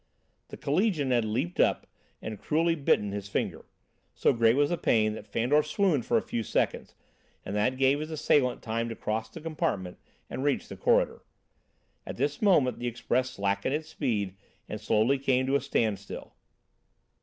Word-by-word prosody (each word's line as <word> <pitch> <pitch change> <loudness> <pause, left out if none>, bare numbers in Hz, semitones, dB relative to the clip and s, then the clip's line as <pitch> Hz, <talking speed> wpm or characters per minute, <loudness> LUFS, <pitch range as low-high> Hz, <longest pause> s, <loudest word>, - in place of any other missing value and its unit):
The - - -9
collegian 155 - +1
had 120 -2 +2
leaped 130 +12 -2
up - - +3 0.4
and 110 -2 -5
cruelly 165 +2 +1
bitten 135 -9 +1
his 100 0 -5
finger. - - -2 0.5
So - - +3
great 115 -1 +4
was 145 +2 +2
the 175 - +1
pain 110 -2 +2
that 110 - -9
Fandor 125 +8 +2
swooned 150 - 0
for - - +3
a - - 0
few 115 - -3
seconds, - - -1 0.5
and 100 - -4
that 125 +5 +1
gave 135 +2 +3
his 155 +1 -5
assailant 145 -5 +1
time 115 +1 -2
to 115 - -5
cross 110 +1 -3
the 165 - -10
compartment 155 - -2 0.3
and 130 - -5
reach 145 -2 0
the - - -7
corridor. - - +2 0.8
At - - -7
this 145 +3 -1
moment 170 -12 +3
the 120 - -3
express 125 +2 0
slackened 100 +3 -1
its 155 +1 -5
speed 105 -11 -1 0.3
and 105 - -6
slowly 110 +5 +2
came 130 -1 +2
to 135 +1 +1
a 140 - +2
standstill. 110 -7 -2
130 Hz, 175 wpm, -28 LUFS, 110-145 Hz, 0.8 s, great